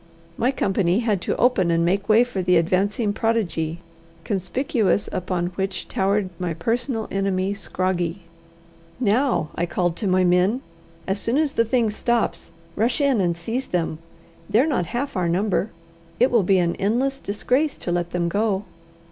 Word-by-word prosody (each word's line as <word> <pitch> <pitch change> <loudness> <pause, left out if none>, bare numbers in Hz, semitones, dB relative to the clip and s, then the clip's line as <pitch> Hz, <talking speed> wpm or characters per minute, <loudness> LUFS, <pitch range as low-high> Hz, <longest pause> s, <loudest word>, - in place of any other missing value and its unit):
My 240 - +1
company 195 -5 +1
had 210 -6 0
to - - -1
open 220 -8 +3
and 170 0 +2
make 195 +4 0
way 220 +3 +6
for 245 -6 -3
the 180 -1 +3
advancing 200 +5 +1
prodigy, 175 -8 -1 0.4
conspicuous 220 - 0
upon 180 -1 -2
which 190 -1 -3
towered 195 0 0
my 175 -3 -2
personal 230 - -1
enemy 195 0 0
Scroggie. 185 -2 -2 0.8
"Now," 235 - +1
I 175 - -1
called 175 -1 0
to 210 - -1
my 185 0 +3
men, 180 +7 +3 0.4
"as 195 +1 -1
soon 235 +6 0
as 300 -2 +1
the 230 - +2
thing 230 -2 +1
stops, 235 +2 -1 0.3
rush 235 +6 +1
in 275 -7 +3
and 170 -2 0
seize 230 +10 -3
them: 165 -3 -2 0.5
they're 235 +6 +4
not 245 - 0
half 255 - -3
our 180 -3 0
number. 195 +3 0 0.5
It 250 - +4
will 235 -3 +4
be 190 +1 +3
an 170 -1 +1
endless 250 +7 0
disgrace 255 +7 0
to 175 - -4
let 175 0 -1
them 175 -1 -1
go." 200 +2 0
200 Hz, 165 wpm, -23 LUFS, 180-230 Hz, 0.8 s, way